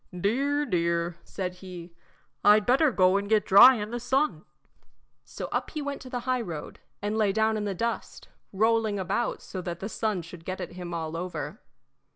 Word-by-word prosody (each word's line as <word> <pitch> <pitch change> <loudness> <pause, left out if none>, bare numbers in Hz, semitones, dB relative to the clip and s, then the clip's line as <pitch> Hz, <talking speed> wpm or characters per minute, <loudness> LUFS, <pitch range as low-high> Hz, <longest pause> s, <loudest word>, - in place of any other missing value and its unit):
"Dear, 280 +9 +1
dear," 170 - 0
said 180 -2 -5
he, 180 -2 -9 0.5
"I'd 210 0 +6
better 270 +4 +4
go 185 -2 +4
and 200 0 -3
get 215 -2 +3
dry 245 +7 +9
in 210 -1 -4
the 240 - -3
sun." 270 +5 0 0.8
So - - -7
up - - -1
he 305 - -5
went 285 0 -4
to 255 - -10
the 250 -1 -3
highroad, 235 - -3 0.2
and 205 +1 -1
lay 215 -2 +2
down 220 +2 +2
in 210 -1 -2
the 200 -2 -2
dust, 230 +5 -4 0.2
rolling 220 +1 +2
about 195 +5 -2
so 185 - -6
that 175 -1 -5
the 195 - -4
sun 215 -6 -2
should 170 0 -11
get 185 +2 -5
at - - -5
him 175 -1 -7
all 165 -1 -4
over. 165 - -5
205 Hz, 190 wpm, -27 LUFS, 180-235 Hz, 0.8 s, dry